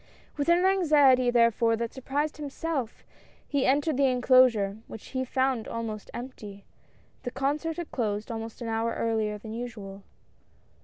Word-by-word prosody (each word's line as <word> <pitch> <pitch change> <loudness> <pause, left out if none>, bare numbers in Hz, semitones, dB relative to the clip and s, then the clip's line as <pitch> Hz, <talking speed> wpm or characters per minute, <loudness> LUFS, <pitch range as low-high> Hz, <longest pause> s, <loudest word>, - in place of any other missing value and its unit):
With 290 +1 -1
an 350 +2 +4
anxiety 295 -10 +4
therefore 230 -1 +3
that 230 0 -4
surprised 285 +3 -2
himself 290 -3 -4 0.4
he 285 -3 0
entered 290 +2 +2
the 275 -1 +4
enclosure, 245 -5 +4
which 220 - -10
he 260 -1 -2
found 260 -2 0
almost 220 -2 -5
empty 210 -5 -9 0.3
— - - -34
the - - -4
concert 295 +5 -2
had 345 -2 -6
closed 215 -3 -2
almost 225 +1 -6
an - - -4
hour 225 +1 -1
earlier 220 -2 -1
than 215 +1 -9
usual. 215 -5 -7
245 Hz, 150 wpm, -27 LUFS, 225-280 Hz, 0.4 s, an